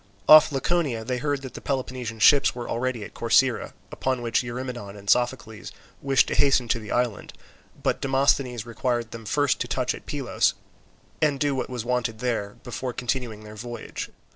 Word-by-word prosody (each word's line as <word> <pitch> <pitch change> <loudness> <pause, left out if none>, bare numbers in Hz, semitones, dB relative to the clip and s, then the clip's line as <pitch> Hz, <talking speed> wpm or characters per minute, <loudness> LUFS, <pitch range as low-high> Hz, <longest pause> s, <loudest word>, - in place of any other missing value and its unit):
Off 155 0 +9
Laconia 135 -5 0
they 125 0 -2
heard 145 0 -1
that 130 - -7
the - - -8
Peloponnesian 130 -4 -3
ships 135 +6 +5
were 120 -1 -5
already 120 -1 -2
at - - -10
Corcyra, 115 +2 +2 0.2
upon 130 -2 -2
which 115 -1 +1
Eurymedon 120 -4 -6
and 100 0 -13
Sophocles 120 -2 0 0.3
wished 135 -1 +3
to - - -1
hasten 135 -3 +3
to 115 - +1
the 105 -2 -9
island, 120 -3 -1 0.5
but - - 0
Demosthenes 135 -3 +1
required 120 0 -2
them 115 -1 -8
first 145 +4 +1
to - - -2
touch - - 0
at - - -11
Pylos - - 0 0.7
and 145 -3 +2
do 145 0 +1
what 130 - -3
was 125 -3 -4
wanted 120 -2 -1
there, 115 -4 -2
before 125 0 -4
continuing 120 -4 -3
their 105 0 -10
voyage. 120 +1 -6
125 Hz, 175 wpm, -25 LUFS, 115-135 Hz, 0.7 s, Off